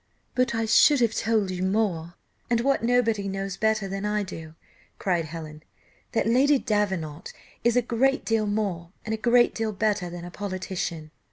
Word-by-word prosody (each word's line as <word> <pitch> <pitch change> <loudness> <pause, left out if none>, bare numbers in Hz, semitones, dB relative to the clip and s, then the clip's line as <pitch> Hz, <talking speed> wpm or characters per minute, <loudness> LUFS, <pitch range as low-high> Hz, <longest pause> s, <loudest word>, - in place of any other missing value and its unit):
"But 250 -2 +1
I 225 0 0
should 275 +6 +5
have 230 -2 +3
told 215 -4 +1
you 180 -1 -4
more, 185 -4 0 0.3
and 235 -1 +2
what 275 -1 +1
nobody 230 -4 +2
knows 195 0 -3
better 215 -1 +1
than 195 +1 -4
I 210 0 0
do," 160 -4 -9 0.4
cried 175 -4 0
Helen, 155 -1 -8 0.5
"that 225 - +1
Lady 265 +6 +4
Davenant 190 - -2 0.3
is 235 +1 +3
a 245 - +3
great 265 +4 +1
deal 225 -2 +1
more, 195 -5 -2
and 220 - -2
a - - +2
great 240 +2 +3
deal 220 -1 -2
better 205 -3 0
than 175 0 -7
a 175 - -8
politician. 185 -5 -4
210 Hz, 175 wpm, -26 LUFS, 180-225 Hz, 0.5 s, should